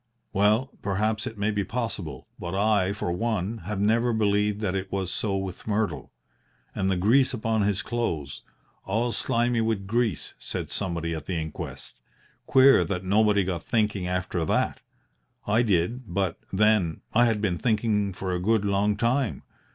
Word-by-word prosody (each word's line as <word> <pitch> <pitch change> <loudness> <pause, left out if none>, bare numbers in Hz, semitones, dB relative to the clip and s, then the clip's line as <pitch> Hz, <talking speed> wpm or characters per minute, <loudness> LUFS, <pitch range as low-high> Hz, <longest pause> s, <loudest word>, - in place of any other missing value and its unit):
Well, 105 +7 +3
perhaps 110 +3 -1
it 110 - -7
may 100 +2 0
be 105 -1 0
possible, 95 - -4
but 85 +1 -4
I, 100 -2 +2
for 100 -4 -3
one, 110 +2 -1
have 105 0 -3
never 115 +4 +2
believed 105 -1 +1
that 100 -4 0
it 95 -1 -3
was 95 -2 -2
so 100 -3 -1
with 95 0 -6
Myrtle. 105 -4 -1 0.6
And 95 -1 0
the 95 - +1
grease 120 +9 +3
upon 110 0 0
his 100 -1 0
clothes 85 - -3 0.4
'all 115 +5 0
slimy 120 0 +1
with 110 -3 -1
grease,' 115 -3 -1
said - - -5
somebody 85 -4 -2
at 80 -2 -6
the 95 - -2
inquest. 80 -1 -7 0.5
Queer 135 -7 +6
that 90 +2 -3
nobody 100 +1 +3
got 90 -3 -2
thinking 105 -4 0
after 90 -1 -1
that! - - 0 0.7
I 110 +3 +3
did 110 +2 0
but, 95 -2 -1
then, 105 -5 +2
I 120 +2 +5
had 115 -3 +1
been 95 -5 -1
thinking 105 -3 +1
for 95 0 -4
a 90 - -1
good 110 +1 +2
long 100 +1 +1
time. 120 +2 0
105 Hz, 165 wpm, -26 LUFS, 95-110 Hz, 0.7 s, Queer